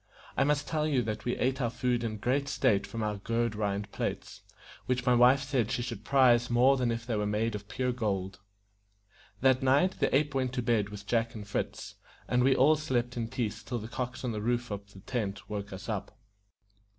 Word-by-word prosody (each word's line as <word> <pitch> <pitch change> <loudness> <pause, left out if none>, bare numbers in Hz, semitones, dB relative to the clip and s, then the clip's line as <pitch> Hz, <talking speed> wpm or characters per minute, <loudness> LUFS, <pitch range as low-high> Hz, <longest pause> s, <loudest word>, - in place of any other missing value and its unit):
I - - +3
must 145 +1 +1
tell 155 -1 0
you 135 -5 +2
that 110 0 -4
we 120 - -1
ate 130 +2 0
our 120 - +1
food 120 0 -1
in 110 -2 -3
great 130 +6 0
state 110 -8 +2
from 115 -2 -4
our 105 -1 -1
gourd 115 +2 -1
rind 100 -1 -2
plates, - - -4 0.5
which 125 0 0
my 125 - +4
wife 125 +3 +5
said 130 -5 0
she 120 - -1
should 115 -5 -6
prize 125 -3 +4
more 125 +3 +5
than 125 -2 0
if 115 0 -3
they 120 -2 -1
were 105 -1 0
made 110 +2 0
of 100 -1 -6
pure 125 0 -1
gold. 100 -6 -2 1.0
That 130 0 +4
night 140 +8 +3
the - - +2
ape 150 +1 +2
went 130 -2 -1
to 125 -2 -1
bed 110 -4 +1
with 100 0 -9
Jack 115 +1 0
and 105 -2 -7
Fritz, 100 - -4 0.3
and 125 0 +2
we 135 0 +4
all 150 +4 +5
slept 125 -5 -1
in 115 -2 -2
peace 115 -3 -3
till 120 +3 -4
the 110 -1 -6
cocks 125 +2 -4
on 125 - -1
the 105 -1 -3
roof 120 +1 -1
of 100 0 -6
the 95 - -13
tent 105 -3 -3
woke 100 -1 -4
us 95 0 -8
up. 105 -4 -4
120 Hz, 220 wpm, -30 LUFS, 105-130 Hz, 1.0 s, wife